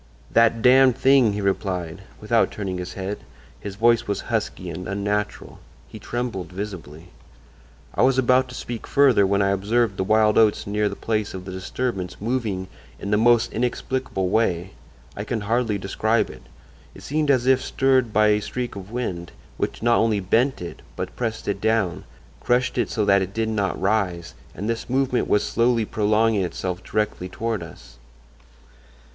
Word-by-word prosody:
"'That 115 -1 +3
Damned 130 0 +6
Thing!' 130 -6 +4
he 105 - -3
replied, 95 -3 -2 0.2
without 115 +2 +2
turning 95 -3 -4
his 90 0 -6
head. 100 +1 -4 0.4
His 100 -1 -7
voice 115 +2 +3
was 100 - -2
husky - - -2
and 90 - -6
unnatural. 105 +1 -3 0.3
He - - -11
trembled 120 -8 -4
visibly. 90 -4 -7 0.8
"I - - 0
was 130 0 +4
about 130 0 +3
to 130 - -9
speak 120 -3 -6
further, 130 -8 +4
when 100 +1 +2
I 100 - +2
observed 105 +2 +1
the - - 0
wild 105 +2 +3
oats 110 -2 +3
near 105 +1 0
the 100 - -6
place 110 -3 -2
of 90 -1 -7
the 95 - -6
disturbance 95 +1 -4
moving 105 -5 -2 0.3
in 100 - -4
the 105 - +4
most 120 +1 +3
inexplicable 120 -3 -2
way. 95 -3 0 0.4
I 105 - -4
can 110 0 -3
hardly 115 0 0
describe 110 +4 0
it. 65 - -13 0.5
It - - -12
seemed 150 +1 -1
as 130 -3 +3
if 130 0 +4
stirred 130 -3 +2
by 105 0 +4
a 105 0 +2
streak 125 +1 -4
of 100 0 -8
wind, 95 -8 -4 0.3
which - - -3
not 120 0 +4
only 110 -2 +2
bent 115 +4 +1
it, 85 - -8
but - - -5
pressed 115 -2 -3
it 100 0 -2
down—crushed 110 - -1
it - - 0
so 105 -3 0
that 100 -1 +4
it 95 +1 -4
did 110 0 0
not 100 -4 -1
rise; 95 -5 -1 0.2
and 100 - -4
this 115 +1 -3
movement 130 -1 +1
was 105 - +2
slowly 115 -1 +1
prolonging 105 0 +2
itself 90 0 -4
directly 105 -3 -2
toward 110 +2 -3
us. - - -12
105 Hz, 170 wpm, -23 LUFS, 95-120 Hz, 0.8 s, Damned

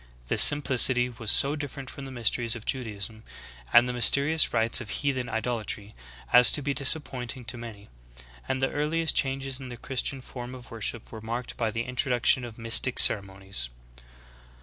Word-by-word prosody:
This - - +5
simplicity 130 -3 +6
was 115 -2 -7
so 140 +6 +3
different 140 -2 -8
from 135 +2 -10
the 135 - -10
mysteries 120 -1 -1
of 115 - -10
Judaism 110 -4 -5 0.5
and 120 +1 +5
the 125 - -4
mysterious 140 +6 +3
rites 115 +3 +3
of 115 - -10
heathen 130 -1 -3
idolatry 110 -3 -5 0.4
as 125 0 +7
to 145 - -3
be 140 +1 -2
disappointing 130 -4 -2
to 120 +1 -7
many; 110 -4 -11 0.6
and 130 0 -3
the 135 - 0
earliest 155 +2 -2
changes 135 -1 -2
in 130 -1 -10
the 120 - -9
Christian 135 +1 -5
form 125 0 -10
of 125 -2 -14
worship 115 0 -5
were 110 - -10
marked 120 +3 -6
by 115 -2 -2
the 115 +2 -4
introduction 125 0 +1
of 120 -2 -10
mystic 115 +2 +2
ceremonies. 95 - +3
125 Hz, 170 wpm, -25 LUFS, 115-135 Hz, 0.6 s, as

